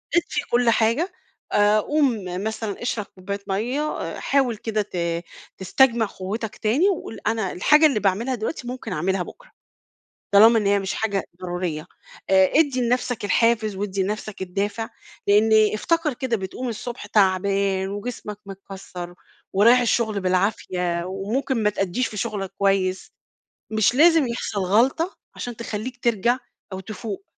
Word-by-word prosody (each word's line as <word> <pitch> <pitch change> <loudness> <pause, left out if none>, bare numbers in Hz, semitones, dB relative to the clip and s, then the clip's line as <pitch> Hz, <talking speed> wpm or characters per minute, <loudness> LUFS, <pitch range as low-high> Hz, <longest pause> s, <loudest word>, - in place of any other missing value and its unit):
اطفِّي 330 -4 +1
كل 240 0 +3
حاجة." 230 - +2 0.4
آآ، 205 +1 +4
قوم 265 -4 +1 0.2
مثلًا 220 -1 -4
اشرَب 235 -3 -2
كوباية 200 +2 -6
مَيَّة، 225 +9 -1 0.2
آآ، - - -5
حاوَل 265 -4 +1
كده 215 0 -1
ت 200 -3 -7 0.6
تستجمِع 230 +4 +3
قوَّتَك 210 +3 -5
تاني 260 - +2
وقل: 340 - -4
"أنا 220 -4 0
الحاجة 300 - +5
اللي 275 -8 +3
باعمَلها 210 +6 0
دلوقتي، 240 +3 -4
ممكن 245 -5 -5
أعملها 180 +4 0
بُكرة، - - -14 0.8
طالما 225 +3 +7
إن 210 - -1
هي 200 0 +4
مش 195 0 -3
حاجة 200 -3 -1 0.2
ضرورية." 175 -3 -3 0.4
آآ، 190 -1 +5
ادِّي 285 -4 +3
لنفسَك 245 -1 0
الحافز 220 0 +2
وأدِّي 195 -1 -2
لنفسَك 210 +1 -4
الدافِع، 205 +4 -2 0.4
لإن 210 +2 +5 0.2
افتكر 330 +6 0
كده، 250 -2 -1
بتقوم 200 +6 -5
الصبح 235 0 -6
تعبان 195 -1 +2
وجسمك 210 0 -6
متكسّر، 190 -2 -9 0.4
ورايِح 230 +6 +6
الشغل 225 -3 +1
بالعافية، 180 -2 0
وممكن 220 +6 -2
ما 210 - +3
تأدِّيش 195 +4 -1
في 215 - -8
شغلَك 205 -3 -3
كويِس. 190 -1 0 0.6
مش 220 +1 +2
لازِم 320 -1 +5
يحصل 235 -3 -3
غلَطة 245 - +2 0.2
عشان 245 -1 -6
تخلِّيك 235 +2 -6
ترجع 235 +2 +2 0.3
أو 190 - -4
تفوق. 205 0 -7
215 Hz, 140 wpm, -23 LUFS, 195-240 Hz, 0.8 s, طالما